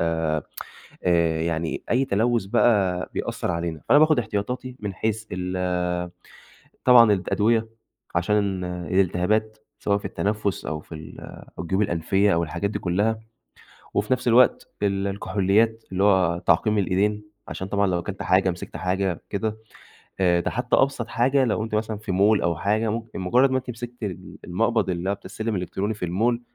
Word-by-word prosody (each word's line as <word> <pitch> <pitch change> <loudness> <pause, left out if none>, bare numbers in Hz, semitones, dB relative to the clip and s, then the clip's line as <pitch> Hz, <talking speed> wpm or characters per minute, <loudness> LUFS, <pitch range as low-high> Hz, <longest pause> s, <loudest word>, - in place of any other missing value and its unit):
آآ 80 -2 0 1.0
يعني 85 -1 -2
أي 130 +3 +3
تلوث 115 +1 +1
بقى 95 -3 +2
بيأثر - - -2
علينا، 85 -2 -3
فأنا 145 - +7
باخد 155 -3 +5
احتياطاتي 125 +3 -3
من 100 -2 -4
حيث 110 +2 -2
ال 90 -1 -2 0.8
طبعًا 120 -4 +8
الأدوية 110 +4 +1 0.5
عشان 95 +1 +1
الالتهابات 95 +4 0 0.2
سواء 100 0 +1
في - - -9
التنفس 105 -2 -2
أو 80 -1 -3
في 80 - -10
ال 80 +1 -10 0.4
أو - - -2
الجيوب 95 +4 0
الأنفية 95 +2 +2
أو 85 - +1
الحاجات 85 +5 -2
دي - - -4
كلها، 105 +5 0 0.8
وفي 105 +5 0
نفس 125 -1 +1
الوقت 120 +1 +4
ال 100 -1 0
الكحوليات 100 +3 +1
اللي 95 +2 +1
هو 95 -4 +3
تعقيم 105 +5 +3
الإيدين، 100 +3 +1 0.3
عشان 95 - -5
طبعًا 100 0 +1
لو 90 -2 +1
أكلت 95 +3 -5
حاجة 95 +1 +3
مسكت 85 0 -7
حاجة 95 0 -1
كده، 110 +2 -2 0.6
آآ 85 -2 +3
ده - - -2
حتى 125 0 0
أبسط 130 -4 +1
حاجة 130 +3 +2
لو 110 -2 0
أنتِ 110 - -5
مثلًا 110 0 -1
في 105 -3 -5
mall 100 +3 +3
أو 85 -1 +1
حاجة 110 +3 0
ممكن 115 -3 -5
مجرد 125 +9 +3
ما 130 - +2
أنتِ 125 -1 -6
مسكت 120 +1 -8
ال 95 -5 -6
المقبض 110 +3 0
اللي 90 +2 -2
هو - - +1
بتاع - - -18
السلم 110 -2 -3
الإلكتروني 95 +4 -2
في 90 -4 -4
الmall، 115 +7 +1
100 Hz, 165 wpm, -24 LUFS, 90-110 Hz, 1.0 s, طبعًا